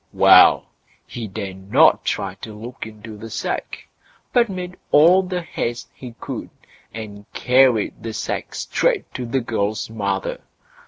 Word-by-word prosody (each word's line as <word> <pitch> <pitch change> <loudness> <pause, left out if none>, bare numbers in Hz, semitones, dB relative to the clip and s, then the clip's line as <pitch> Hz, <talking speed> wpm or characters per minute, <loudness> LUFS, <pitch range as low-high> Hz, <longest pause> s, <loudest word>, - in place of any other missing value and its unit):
Well, - - +7 0.4
he 115 -2 -6
dared 95 -1 -7
not - - +5
try 95 -1 -2
to 110 - -8
look 115 +2 -8
into 110 0 -11
the 115 +2 -9
sack, - - -4 0.5
but 235 -2 +4
made 180 -1 -6
all 170 +6 +6
the 180 -1 -4
haste 120 -6 -4
he 125 -3 -10
could, - - -6 0.4
and 105 -2 -9
carried 125 -5 +3
the 115 0 -5
sack - - -4
straight - - -1
to 125 - -5
the 130 +2 0
girl's 110 -2 -2
mother. 100 -3 -3
115 Hz, 145 wpm, -21 LUFS, 105-135 Hz, 0.5 s, Well